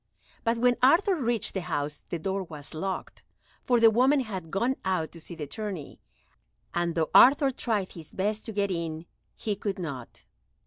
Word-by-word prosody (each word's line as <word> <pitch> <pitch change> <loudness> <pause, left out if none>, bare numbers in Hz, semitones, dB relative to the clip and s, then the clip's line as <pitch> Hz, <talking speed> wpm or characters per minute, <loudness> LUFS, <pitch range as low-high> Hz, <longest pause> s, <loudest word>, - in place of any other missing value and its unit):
But 230 0 +1
when 245 +1 +3
Arthur 345 +9 +5
reached 240 - -1
the 190 - -2
house 145 -2 -3
the 170 - -2
door 190 +4 -2
was 155 -5 -8
locked, 190 +4 -4 0.4
for 245 -1 +3
the 225 -1 +7
women 265 +5 +4
had 190 -9 -5
gone 235 +9 +1
out 185 -4 -1
to 170 - -11
see 170 - -8
the 155 -3 -5
tourney, 190 0 -6 0.7
and, 175 -1 0
though 160 -2 0
Arthur 275 +2 +7
tried 215 -6 -2
his 160 -3 -11
best 210 +3 -1
to - - -3
get 200 -2 0
in, 165 -2 -3 0.3
he 210 -2 -2
could 200 0 -3
not. 140 -9 -7
195 Hz, 180 wpm, -28 LUFS, 165-230 Hz, 0.7 s, the